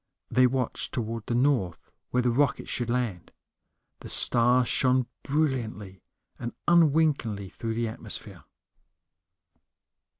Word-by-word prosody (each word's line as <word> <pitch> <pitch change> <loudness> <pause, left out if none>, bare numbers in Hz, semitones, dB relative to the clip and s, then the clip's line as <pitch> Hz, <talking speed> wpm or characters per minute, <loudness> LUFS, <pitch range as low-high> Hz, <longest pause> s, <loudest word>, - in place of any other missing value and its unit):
They 130 0 +5
watched 125 -1 -2
toward 115 -2 -4
the 120 - -1
north, 120 - 0 0.2
where 125 0 +1
the 120 - +2
rocket 140 +3 +1
should 120 -1 -2
land. 120 -8 -2 0.7
The - - -10
stars 120 +1 +3
shone 130 -1 +2 0.2
brilliantly 120 - -2 0.4
and 120 - -5
unwinkingly 150 - +3
through 115 +3 -4
the 115 0 -1
atmosphere. 110 - -8
120 Hz, 110 wpm, -27 LUFS, 110-135 Hz, 0.7 s, They